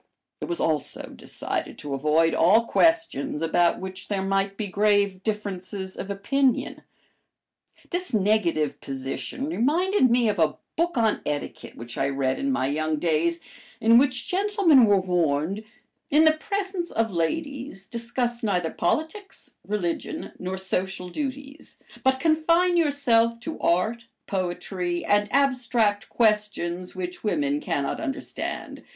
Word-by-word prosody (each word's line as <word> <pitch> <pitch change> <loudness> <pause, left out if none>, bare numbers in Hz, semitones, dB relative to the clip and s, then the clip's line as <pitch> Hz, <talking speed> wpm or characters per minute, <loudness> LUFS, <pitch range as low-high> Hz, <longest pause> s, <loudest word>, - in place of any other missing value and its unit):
It - - -2
was 345 - -2
also 155 -3 -1
decided - - -4
to 145 -1 -5
avoid 155 +4 +2
all 210 +8 +4
questions 325 - +1
about 170 +1 +2
which 190 0 -7
there 195 -2 -1
might 195 0 0
be 215 - -2
grave 200 -1 +2
differences 195 -2 -4
of 195 - -6
opinion. 250 +7 0 1.1
This 360 +1 -3
negative 195 -8 +1
position 135 - -4
reminded 320 - +2
me 240 0 +3
of 205 -3 0
a 155 -2 +2 0.2
book 340 -3 0
on 220 -2 +2
etiquette 145 -1 -5
which 120 0 -7
I 135 - +1
read 135 -1 -1
in 275 0 0
my 260 - 0
young 155 +3 -1
days, 165 +1 0 0.4
in 230 +1 +6
which 255 -2 +1
gentlemen 375 - +4
were 205 -2 +4
warned, 180 +1 0 0.5
"In 300 +2 +5
the 315 - +7
presence 380 +1 -3
of 225 -1 0
ladies 255 - -3
discuss 235 +1 -2
neither 180 -7 0
politics, 320 - -3 0.2
religion, 210 - -3
nor 185 +1 -4
social 190 -1 -3
duties, 280 - -6 0.3
but 265 0 +3
confine 335 +3 +3
yourself 245 -8 +2
to 320 +3 -5
art, 220 +7 0 0.2
poetry, 180 -1 -3
and 205 0 +2
abstract 245 -7 +1
questions 210 -6 0
which 180 -1 -5
women 145 -8 0
cannot 140 - -2
understand. 285 -5 -4
205 Hz, 135 wpm, -25 LUFS, 175-275 Hz, 1.1 s, the